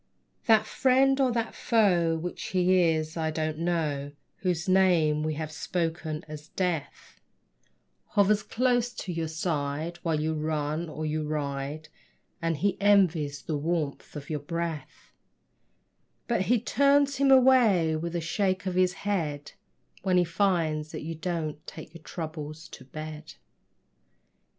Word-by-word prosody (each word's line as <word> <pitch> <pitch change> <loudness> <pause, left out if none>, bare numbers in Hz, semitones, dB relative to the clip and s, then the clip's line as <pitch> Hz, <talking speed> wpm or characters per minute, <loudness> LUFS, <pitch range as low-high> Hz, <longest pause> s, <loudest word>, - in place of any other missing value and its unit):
That 220 -1 +5
friend 270 +3 +3
or 260 -2 +3
that 230 -1 -2
foe 180 -8 +2
(which 175 +2 -5
he 185 0 +3
is, 155 0 -1
I 160 -1 -1
don't 155 0 -2
know), 150 -5 -1 0.2
Whose 180 -1 -1
name 175 -5 +3
we 155 0 -1
have 155 0 -4
spoken 160 -1 -3
as 150 0 -9
Death, 175 -4 -4 0.9
Hovers 205 +1 +4
close 245 +2 +1
to 185 -6 -5
your 165 -1 -2
side, 160 0 -3
while 165 -3 0
you 160 +1 0
run 155 +1 -2
or 155 0 -5
you 155 0 -2
ride, 145 0 -3 0.5
And 165 -2 0
he 195 +4 0
envies 170 -8 +3
the 150 -3 -2
warmth 155 -2 -3
of 145 -1 -7
your 150 -2 -2
breath; 165 +1 -5 1.1
But 235 -5 +1
he 245 -1 +4
turns 280 +3 +3
him 275 0 +3
away, 245 -11 +5
with 170 +2 -4
a 170 - -1
shake 185 +3 -1
of 185 - -1
his 180 0 +2
head, 150 -8 -2 0.5
When 185 -2 +2
he 180 - +5
finds 165 -4 0
that 155 - -5
you 165 +2 -4
don't 160 -2 -4
take 155 0 -9
your 165 - -12
troubles 155 -1 -7
to 130 - -12
bed. 155 +2 -8
165 Hz, 145 wpm, -28 LUFS, 155-190 Hz, 1.1 s, That